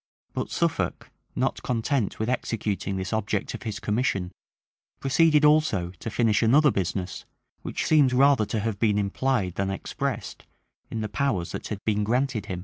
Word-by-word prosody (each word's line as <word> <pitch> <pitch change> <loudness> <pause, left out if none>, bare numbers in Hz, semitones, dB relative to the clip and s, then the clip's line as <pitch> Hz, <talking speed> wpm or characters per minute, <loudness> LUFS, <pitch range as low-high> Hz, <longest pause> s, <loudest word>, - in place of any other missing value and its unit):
[*] - - -47
But - - -3
Suffolk, - - -1 0.2
not - - -1
content 120 -1 -1
with 110 - -2
executing 105 -5 -2
this 95 +3 -3
object 105 -2 -1
of - - -6
his 110 -3 -4
commission, 105 -5 -1 0.7
proceeded 150 +2 +4
also 150 - +3
to - - -4
finish 110 -2 +2
another 140 +6 +5
business, 90 -2 -3 0.4
which - - -3
seems 150 -5 +5
rather 135 -3 +4
to 110 - -1
have 110 -2 -2
been 105 -2 +2
implied 105 -1 0
than 95 +1 -1
expressed 95 - -4 0.4
in 115 - -3
the 110 - -2
powers 105 -7 -1
that - - -5
had 105 -2 -6
been 105 -1 +1
granted 120 -1 0
him. 90 -2 -4
110 Hz, 165 wpm, -26 LUFS, 100-130 Hz, 0.7 s, another